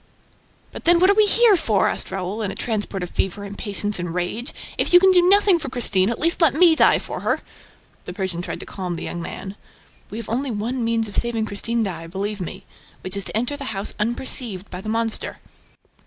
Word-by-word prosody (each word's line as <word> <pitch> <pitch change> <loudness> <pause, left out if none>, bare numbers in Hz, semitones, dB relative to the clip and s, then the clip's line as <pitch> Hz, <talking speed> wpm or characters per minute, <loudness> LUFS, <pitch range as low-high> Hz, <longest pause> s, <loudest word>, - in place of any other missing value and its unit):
"But - - -10
then, 340 0 +6
what 370 +2 +5
are - - +4
we 425 0 +4
here 455 0 +6
for?" 220 - +1
asked - - -1
Raoul, 190 +3 -4
in 205 - -1
a - - -5
transport 205 -4 -2
of 180 - -6
fever, 195 +2 -2
impatience 205 0 -2
and 175 -1 -4
rage. 200 - -3 0.3
"If - - 0
you 355 - +10
can 380 +1 +5
do 360 -1 +5
nothing 390 0 +5
for 310 - -5
Christine, 205 -6 +2
at 235 - -2
least 335 +3 0
let 305 -5 +4
me 340 0 +6
die - - +5
for - - -6
her!" - - -1 0.6
The 180 - -6
Persian 185 -3 -3
tried - - -5
to - - -8
calm 180 -3 -5
the - - -6
young 170 - -5
man. 190 +3 -7 0.5
"We 210 - -7
have 230 - -6
only 260 +5 -2
one 235 +3 -3
means 230 -1 0
of 205 - -8
saving 230 -2 0
Christine 225 +3 -1
Daae, 165 -5 -4
believe 200 +3 -4
me, 175 - -7 0.4
which 185 +1 -4
is 200 -2 -2
to - - -3
enter 245 +5 -1
the 265 -8 -5
house 195 - -1
unperceived 220 -3 -1
by 180 0 -6
the 215 - -6
monster." 225 0 -1
220 Hz, 225 wpm, -22 LUFS, 195-265 Hz, 0.6 s, you